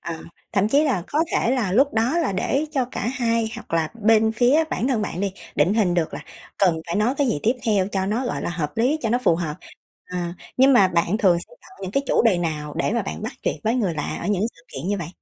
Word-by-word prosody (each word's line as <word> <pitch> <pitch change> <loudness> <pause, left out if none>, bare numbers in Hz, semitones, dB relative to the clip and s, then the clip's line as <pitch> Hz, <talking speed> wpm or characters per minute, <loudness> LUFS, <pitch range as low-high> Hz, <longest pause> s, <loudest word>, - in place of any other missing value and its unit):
À, 165 -1 -5 0.3
thậm 200 +1 +2
chí 285 +6 +4
là 250 - 0
có 295 - -2
thể 230 - +2
là 240 -8 0
lúc 275 +7 +3
đó 235 +9 +2
là 330 -11 0
để 270 +10 0
cho 270 -5 0
cả 240 -3 -5
hai 230 -3 0
hoặc - - -10
là 160 -2 +1
bên 220 +1 +4
phía 255 +8 +3
bản 250 - -1
thân 240 -5 +1
bạn 185 -3 -4
đi 200 -1 -1 0.2
định 165 +7 +3
hình 200 -6 +2
được 170 -3 0
là - - -5 0.4
cần 185 -4 +4
phải 170 - -2
nói 220 +5 +2
cái 280 0 +1
gì 190 - 0
tiếp 230 - +3
theo 200 -4 +2
cho 190 -1 0
nó, 230 +6 -1
gọi - - -3
là, - - -2
hợp 160 -4 -4
lý, 255 +7 +2
cho 225 - 0
nó 240 - +3
phù 190 -10 +2
hợp. 165 -3 -3 0.5
À, 175 -1 -4 0.2
nhưng 265 +2 +6
mà 200 -7 +6
bạn 175 +3 +1
thường 185 -6 +4
sẽ 335 - -11
chọn 380 - -18
những 185 - -4
cái 275 +7 0
chủ - - +3
đề 220 -6 +3
nào 150 -3 -3
để 170 - 0
mà 235 - 0
bạn 195 - -6
bắt 220 - -4
chuyện - - -1
với 225 +2 +2
người 205 -9 0
lạ 150 - -3
ở 170 - -4
những 205 -1 +1
sự 165 - -20
kiện 135 +6 -4
như 205 -1 0
vậy? 170 - -5
210 Hz, 270 wpm, -23 LUFS, 175-245 Hz, 0.5 s, nhưng